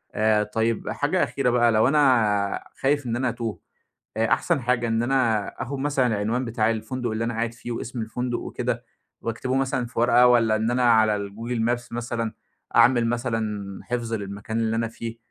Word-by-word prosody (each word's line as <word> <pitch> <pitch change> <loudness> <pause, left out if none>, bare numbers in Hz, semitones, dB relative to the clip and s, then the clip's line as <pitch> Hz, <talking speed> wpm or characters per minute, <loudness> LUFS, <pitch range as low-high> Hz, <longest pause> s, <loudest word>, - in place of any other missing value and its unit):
آآ 110 0 +3
طيب 110 +2 -1
حاجة - - +1
أخيرة 135 -3 0
بقى 120 -1 +4
لو 110 +2 +4
أنا 115 -9 +2 0.2
خايف 145 +1 +1
إن 120 -1 -1
أنا 130 +1 0
أتوه، 115 -2 -4 0.6
آآ، 115 0 +2
أحسن 165 -6 0
حاجة 120 -1 +1
إن 115 +1 +1
أنا 120 -5 +1 0.2
آخد 135 +3 -5
مثلًا 140 -2 +1
العنوان 110 +3 -1
بتاع 115 -1 +1
الفندق 115 +2 -3
اللي 110 +1 -2
أنا 120 - -2
قاعد 115 +1 -2
فيه 120 +1 -8
واسم 120 +1 -4
الفندق 120 +2 -3
وكده - - -3 0.4
وأكتبه 125 +3 -2
مثلًا 135 -2 0
في 115 - -5
ورقة، 120 +1 +5
والَّا 115 -3 +4
إن 110 +2 0
أنا 125 +1 +1
على 105 -3 +3
الgoogle 115 +4 -4
Maps 120 0 -2
مثلًا، 115 -1 -3 0.4
أعمل 120 0 +5
مثلًا 110 -5 -2
حفظ 120 -2 -3
للمكان 100 +1 -4
اللي 115 0 0
أنا 115 0 0
فيه، 115 0 -7
115 Hz, 180 wpm, -24 LUFS, 110-125 Hz, 0.6 s, ورقة